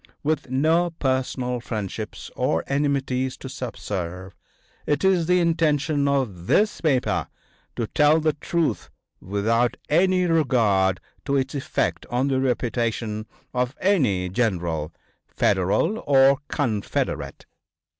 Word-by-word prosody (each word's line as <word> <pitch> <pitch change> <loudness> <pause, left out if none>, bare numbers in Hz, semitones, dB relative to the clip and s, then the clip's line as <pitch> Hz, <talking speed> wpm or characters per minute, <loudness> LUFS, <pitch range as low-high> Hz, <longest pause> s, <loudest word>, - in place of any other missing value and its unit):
With 150 -3 -1
no 160 +7 +2
personal 130 -4 -1
friendships 110 -2 -5
or 80 - 0
enmities 135 -2 0
to - - -8
subserve, 95 -8 -5 0.5
it 145 - +1
is 185 -4 +3
the 180 0 +4
intention 155 -4 +1
of 115 -11 -1
this 210 +1 +2
paper 140 -6 +1 0.5
to 115 - -1
tell 150 +7 +3
the 155 -1 +1
truth 165 +2 -1 0.3
without 110 +5 0
any 185 +3 +3
regard 115 - +2 0.3
to 140 - 0
its 135 +1 0
effect 140 -2 -2
on 125 +3 0
the 130 -1 +1
reputation 115 -4 -1 0.3
of 125 +2 -1
any 130 - +2
general, 85 -7 -1 0.4
Federal 100 - +1
or 135 -1 +5
Confederate. 110 -9 -2
130 Hz, 115 wpm, -24 LUFS, 110-150 Hz, 0.5 s, or